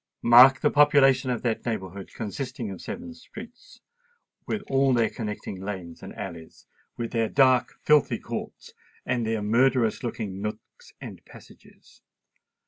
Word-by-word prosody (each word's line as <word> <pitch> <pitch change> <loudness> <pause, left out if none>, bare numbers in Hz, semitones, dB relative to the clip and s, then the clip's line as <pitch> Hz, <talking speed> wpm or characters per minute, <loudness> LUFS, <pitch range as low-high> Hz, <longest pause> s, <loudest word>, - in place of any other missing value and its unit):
Mark 125 +3 +7
the - - +2
population 140 -3 +4
of 120 -2 -2
that 115 -3 -1
neighbourhood, 100 -4 -5
consisting 120 0 -5
of 95 - -9
seven 255 +1 -7
principal - - -9
streets, 235 +1 -13 0.7
with 210 -2 -3
all 135 -1 +2
their 115 -3 +1
connecting 105 -4 -6
lanes 95 -4 -7
and - - -10
alleys—with 85 +7 -9
their 115 -2 0
dark, 130 -2 +3
filthy 150 -1 +3
courts, - - -8 0.3
and 120 -3 -1
their 110 -2 -1
murderous 120 +1 +2
looking 105 -6 -5
nooks 105 +1 -8
and - - -10
passages! - - -18
120 Hz, 135 wpm, -25 LUFS, 105-135 Hz, 0.7 s, Mark